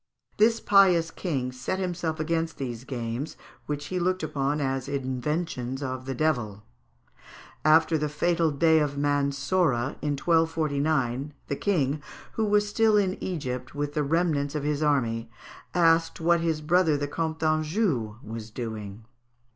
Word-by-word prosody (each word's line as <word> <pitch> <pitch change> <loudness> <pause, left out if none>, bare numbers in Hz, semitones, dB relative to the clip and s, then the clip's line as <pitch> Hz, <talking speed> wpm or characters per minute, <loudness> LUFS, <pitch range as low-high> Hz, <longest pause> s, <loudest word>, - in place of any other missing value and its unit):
This 225 +2 +4
pious 185 -6 +4
king 135 -10 -2
set 130 +8 -3
himself 175 -4 -2
against 165 +1 -1
these 125 -2 -5
games, 120 +2 -4 0.3
which 145 -1 -3
he 180 - 0
looked 185 0 0
upon 145 -1 -1
as 135 -2 -1
inventions 135 0 -2
of 130 -1 -4
the 135 0 -3
devil. 120 -9 -1 1.0
After 160 +1 +4
the 150 0 -1
fatal 165 +2 +1
day 160 +2 +4
of 145 -2 -1
Mansorah, 140 -1 +1
in 150 -1 0
1249, 150 -4 +1
the 140 - -2
King, 150 -6 0 0.3
who 220 - -1
was 210 0 +3
still 215 0 +3
in 190 -2 0
Egypt 130 -7 -4
with 145 0 -2
the 150 - 0
remnants 150 -1 0
of 150 - -2
his 150 0 -1
army, 115 -7 +1 0.5
asked 165 -1 +3
what 170 +1 +3
his 165 -2 -1
brother, 160 -1 +3
the 145 0 -2
Comte 160 +2 -2
d'Anjou, 155 - 0
was 110 0 -7
doing. 110 -2 -6
150 Hz, 145 wpm, -27 LUFS, 135-165 Hz, 1.0 s, This